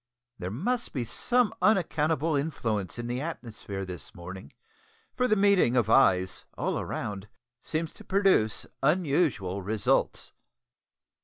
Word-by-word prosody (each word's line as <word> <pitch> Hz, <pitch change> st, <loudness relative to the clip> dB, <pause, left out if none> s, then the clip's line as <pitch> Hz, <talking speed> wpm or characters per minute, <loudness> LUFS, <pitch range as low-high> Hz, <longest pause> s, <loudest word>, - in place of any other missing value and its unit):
There 90 Hz, -, -3 dB
must 235 Hz, -, -2 dB
be 125 Hz, -4 st, -2 dB
some 245 Hz, -, +1 dB
unaccountable 160 Hz, -6 st, +2 dB
influence 115 Hz, -, -2 dB
in 120 Hz, -, -4 dB
the 120 Hz, +2 st, -2 dB
atmosphere 110 Hz, -10 st, -6 dB
this 90 Hz, +1 st, -9 dB
morning, 95 Hz, +2 st, -9 dB, 0.6 s
for 250 Hz, 0 st, +2 dB
the 215 Hz, -, +3 dB
meeting 195 Hz, -, +4 dB
of 110 Hz, -2 st, +2 dB
eyes, 95 Hz, -8 st, +3 dB
all -, -, -1 dB
round, 100 Hz, -1 st, -5 dB, 0.3 s
seems 160 Hz, 0 st, -3 dB
to -, -, -14 dB
produce 190 Hz, -, +2 dB, 0.2 s
unusual 140 Hz, -, +1 dB
results! 105 Hz, +2 st, 0 dB
130 Hz, 125 wpm, -28 LUFS, -, 0.6 s, meeting